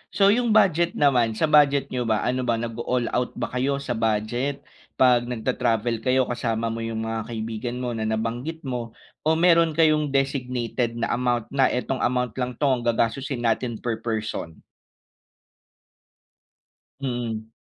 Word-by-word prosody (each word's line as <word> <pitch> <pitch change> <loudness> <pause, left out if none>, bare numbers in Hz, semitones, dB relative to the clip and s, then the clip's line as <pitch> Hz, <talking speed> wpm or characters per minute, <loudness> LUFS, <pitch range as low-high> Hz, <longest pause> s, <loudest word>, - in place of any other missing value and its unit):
so 200 0 +5
yung 230 -1 +2
budget 175 -5 +3
naman 120 -6 +3
sa - - -2
budget 145 -3 +4
n'yo 125 -2 -2
ba 110 -2 +1
ano 125 0 -1
ba 115 - +2
nag-o-all 120 +1 -2
out 125 0 -1
ba - - -4
kayo 140 +2 -1
sa - - -4
budget 115 +5 -1 0.3
pag 125 -2 +4
nag-ta-travel 115 -1 -1
kayo 130 +2 +2
kasama 115 -2 -2
mo 115 - -4
yung 115 -1 -3
mga 110 -1 -3
kaibigan 115 +1 -4
mo 125 - -2
na 110 -2 -2
nabanggit 120 +9 -3
mo 120 -3 -5 0.3
o 160 - +4
mayro'n 165 -2 +4
kayong 155 -2 +3
designated 125 -3 -1
na 115 0 -2
amount 120 -2 -1
na 135 -1 +3
itong 125 +1 -2
amount 125 -1 0
lang 125 -1 -2
'to 150 - -5 0.2
ang 120 - -5
gagastusin 120 +2 0
natin 115 +1 0
per 115 0 -3
person? 110 -8 -4 2.4
Mm. 120 -4 -3
120 Hz, 155 wpm, -24 LUFS, 115-135 Hz, 2.4 s, so